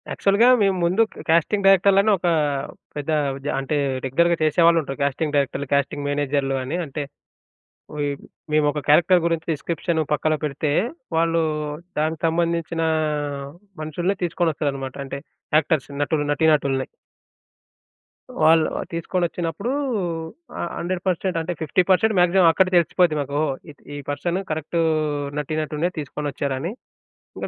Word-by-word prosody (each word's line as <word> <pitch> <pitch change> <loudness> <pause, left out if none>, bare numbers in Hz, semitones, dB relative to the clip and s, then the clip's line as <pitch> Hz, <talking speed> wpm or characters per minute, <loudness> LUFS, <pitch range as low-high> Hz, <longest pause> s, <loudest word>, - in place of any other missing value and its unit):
యాక్చువల్‌గా 200 +4 +3
మేము 195 -2 +3
ముందు 180 +6 +3
క - - -10
క్యాస్టింగ్ 170 +5 +2
డైరెక్టర్‌లని 195 +2 +5
ఒక 180 - -2 0.7
పెద్ద 145 +1 -5 0.4
ద - - -2
అంటే 135 +3 -2 0.3
రెగ్యులర్‌గా 170 +6 +2
చేసేవాళ్ళుంటారు. 160 -3 +3
క్యాస్టింగ్ 145 +2 -1
డైరెక్టర్లు, 140 0 0
క్యాస్టింగ్ 140 0 0
మేనేజర్లు 140 -1 0
అని 140 +7 -3
అంటే, 145 0 -4 1.5
మేము 155 0 +3
ఒక 150 - -4
క్యారెక్టర్ 175 +4 +5
గురించి 165 -1 -1
డిస్‌క్రిప్షన్ 165 +2 -2
పక్కన 155 +1 +1
పెడితే 145 0 -1 0.5
వాళ్ళు 165 0 +2 0.6
దానికి 155 +1 -1
సంబంధించిన 170 0 -1 1.0
మనుషుల్ని 175 +5 -1
తీసుకొని 175 -1 +1
ఒస్తారనమాట. 135 -3 -3
అంటే 140 - -5 0.4
యాక్టర్స్ 155 -2 0
నటులు, 145 0 0
నటీనటుల్ని. 145 -4 +2 1.6
వాళ్ళు 160 0 +5 0.3
తీసుకొనొచ్చినప్పుడు 175 +4 -2 0.9
ఆహ్, 170 - -2
100% 185 0 -1
అంటే 170 +2 -3
50% 185 +6 +2
మాక్సిమమ్ 175 0 +5
అక్కడే 185 +2 +2
తెలిసిపోద్ది 170 -1 +2
మాకు. 140 +1 -2 0.3
ఈ - - -10 0.2
ఈ - - -5
పర్సన్ 175 +5 -1
కరెక్ట్ 160 +2 -2 0.6
నటీనటులనే 155 +3 -2
తీసుకునొచ్చారని. 145 +2 -3 0.6
ఇంకా - - -4
160 Hz, 115 wpm, -22 LUFS, 145-175 Hz, 1.6 s, డైరెక్టర్‌లని